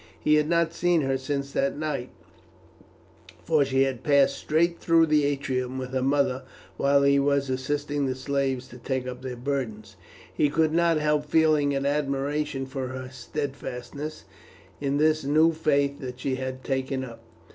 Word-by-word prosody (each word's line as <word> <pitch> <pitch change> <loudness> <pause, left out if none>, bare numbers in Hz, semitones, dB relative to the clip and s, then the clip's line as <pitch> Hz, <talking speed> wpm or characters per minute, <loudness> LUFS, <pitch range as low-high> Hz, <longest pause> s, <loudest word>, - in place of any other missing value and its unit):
He 150 - +2
had 150 0 +3
not 170 -1 +2
seen 175 -1 +2
her 135 -1 0
since 140 +1 -3
that 140 +1 0
night, 150 -5 -3 1.3
for 155 -3 +3
she 135 0 +2
had 130 -3 -2
passed 140 -2 +4
straight 170 +2 +1
through 165 -1 +4
the 150 -2 +3
atrium 130 -2 -2
with 130 -1 -5
her 130 0 0
mother 135 -1 +1 0.3
while 140 0 +3
he 140 0 +4
was 140 -1 +1
assisting 145 +2 -1
the 130 - -1
slaves 135 -1 -1
to 125 - -12
take 130 +1 -2
up 125 0 -6
their 130 -1 -5
burdens. 120 -7 -4 0.4
He 150 - +2
could 155 +1 +1
not 170 -1 +3
help 150 -1 +1
feeling 150 -3 +3
an 135 0 -1
admiration 140 0 -1
for 130 -1 -4
her 130 0 -6
steadfastness 140 +2 -6 0.6
in 140 0 0
this 155 0 +2
new 155 +4 +4
Faith 140 -3 +1
that 125 -2 -7
she 135 - -1
had 130 0 -5
taken 130 0 -2
up. 115 -2 -11
140 Hz, 170 wpm, -26 LUFS, 130-150 Hz, 1.3 s, passed